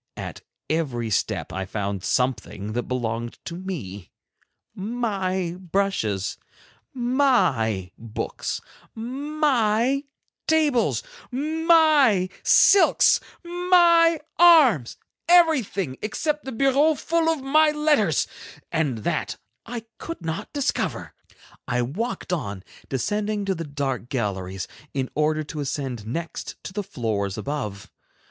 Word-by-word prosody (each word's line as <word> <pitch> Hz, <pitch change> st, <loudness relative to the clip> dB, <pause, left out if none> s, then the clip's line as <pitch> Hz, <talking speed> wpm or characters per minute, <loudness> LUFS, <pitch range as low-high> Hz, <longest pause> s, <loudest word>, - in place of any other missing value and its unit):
At -, -, -6 dB, 0.3 s
every 130 Hz, -8 st, -1 dB
step 95 Hz, -, -1 dB
I 95 Hz, +2 st, -2 dB
found 100 Hz, -1 st, -3 dB
something 110 Hz, -4 st, -1 dB
that 120 Hz, +1 st, -2 dB
belonged 120 Hz, -2 st, -3 dB
to 170 Hz, -, -5 dB
me; 120 Hz, -, -6 dB, 0.6 s
my 190 Hz, -5 st, -2 dB
brushes, 175 Hz, -, -1 dB, 0.5 s
my 195 Hz, -, +1 dB
books, 115 Hz, 0 st, -4 dB, 0.3 s
my 260 Hz, -1 st, +1 dB, 0.4 s
tables, 300 Hz, -7 st, +2 dB, 0.3 s
my 305 Hz, -, +4 dB
silks, 400 Hz, -, +6 dB, 0.2 s
my 345 Hz, -2 st, +4 dB, 0.2 s
arms, 290 Hz, -, +6 dB, 0.3 s
everything, 260 Hz, -, +3 dB
except 300 Hz, +8 st, -2 dB
the 265 Hz, -, -4 dB
bureau 275 Hz, +5 st, +3 dB
full 330 Hz, +2 st, +1 dB
of 320 Hz, -5 st, -1 dB
my 305 Hz, +3 st, +4 dB
letters, 300 Hz, -, +2 dB, 0.5 s
and 140 Hz, -9 st, -1 dB
that -, -, -2 dB, 0.3 s
I 235 Hz, -1 st, -5 dB, 0.2 s
could 330 Hz, -, -7 dB
not 165 Hz, 0 st, -4 dB
discover. 285 Hz, -1 st, -2 dB, 0.5 s
I 125 Hz, 0 st, +1 dB
walked 185 Hz, -, -3 dB
on, 100 Hz, -, -3 dB, 0.3 s
descending 205 Hz, -, -1 dB
to 195 Hz, -, +1 dB
the 165 Hz, -2 st, -5 dB
dark 135 Hz, -4 st, -3 dB
galleries, 95 Hz, -7 st, -3 dB, 0.3 s
in 130 Hz, -2 st, -2 dB
order 155 Hz, +1 st, +1 dB
to 150 Hz, +1 st, -7 dB
ascend 135 Hz, -6 st, -4 dB
next 165 Hz, +8 st, -5 dB
to -, -, -7 dB
the 205 Hz, -, -2 dB
floors 110 Hz, -, -3 dB
above. 105 Hz, -9 st, -5 dB
185 Hz, 110 wpm, -24 LUFS, -, 0.6 s, silks